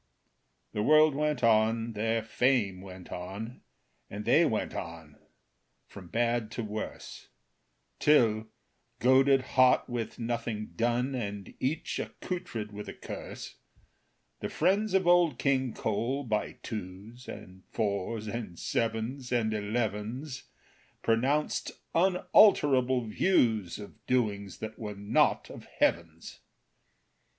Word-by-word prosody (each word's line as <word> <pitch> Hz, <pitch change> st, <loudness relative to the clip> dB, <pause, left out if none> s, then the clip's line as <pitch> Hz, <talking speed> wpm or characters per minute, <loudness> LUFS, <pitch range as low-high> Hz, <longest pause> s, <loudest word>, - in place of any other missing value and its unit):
The 105 Hz, -, -1 dB
world 155 Hz, +5 st, +6 dB
went 150 Hz, -2 st, -1 dB
on, 115 Hz, +1 st, +3 dB
their 115 Hz, +1 st, 0 dB
fame 115 Hz, -5 st, +1 dB
went 95 Hz, -2 st, -11 dB
on, 100 Hz, +7 st, -6 dB, 0.5 s
And 105 Hz, +1 st, -6 dB
they 150 Hz, +8 st, +5 dB
went 110 Hz, -, -1 dB
on 80 Hz, -3 st, -8 dB, 0.7 s
from 95 Hz, -3 st, -12 dB
bad 115 Hz, +2 st, 0 dB
to 120 Hz, -, -3 dB
worse; 105 Hz, 0 st, -6 dB, 0.7 s
Till, 110 Hz, -7 st, +4 dB, 0.5 s
goaded 135 Hz, +2 st, +5 dB
hot 130 Hz, -1 st, +5 dB
with 120 Hz, -3 st, -4 dB
nothing 115 Hz, -2 st, -3 dB
done, 120 Hz, +3 st, 0 dB
And 100 Hz, -5 st, -5 dB
each 150 Hz, +5 st, -2 dB
accoutred 115 Hz, -, -5 dB
with 105 Hz, 0 st, -7 dB
a -, -, -8 dB
curse, -, -, -8 dB, 0.8 s
The -, -, -4 dB
friends 200 Hz, +1 st, +1 dB
of 190 Hz, -1 st, +3 dB
Old 175 Hz, -6 st, +4 dB
King 130 Hz, -2 st, +1 dB
Cole, 120 Hz, +7 st, -1 dB
by 110 Hz, -4 st, -1 dB
twos, 105 Hz, +4 st, -7 dB
And 95 Hz, 0 st, -10 dB
fours, 105 Hz, +1 st, -2 dB
and 105 Hz, -5 st, -5 dB
sevens, 115 Hz, +3 st, -2 dB
and 115 Hz, -3 st, +1 dB
elevens, 115 Hz, +5 st, -3 dB, 0.6 s
Pronounced 130 Hz, +7 st, +1 dB, 0.2 s
unalterable 155 Hz, -, +4 dB
views 110 Hz, -, +2 dB
Of 105 Hz, -, -11 dB
doings 105 Hz, -6 st, 0 dB
that 110 Hz, 0 st, -6 dB
were 105 Hz, -3 st, -5 dB
not 100 Hz, +2 st, +1 dB
of -, -, -10 dB
heaven's. 85 Hz, -1 st, -1 dB
115 Hz, 115 wpm, -29 LUFS, 105-130 Hz, 0.8 s, world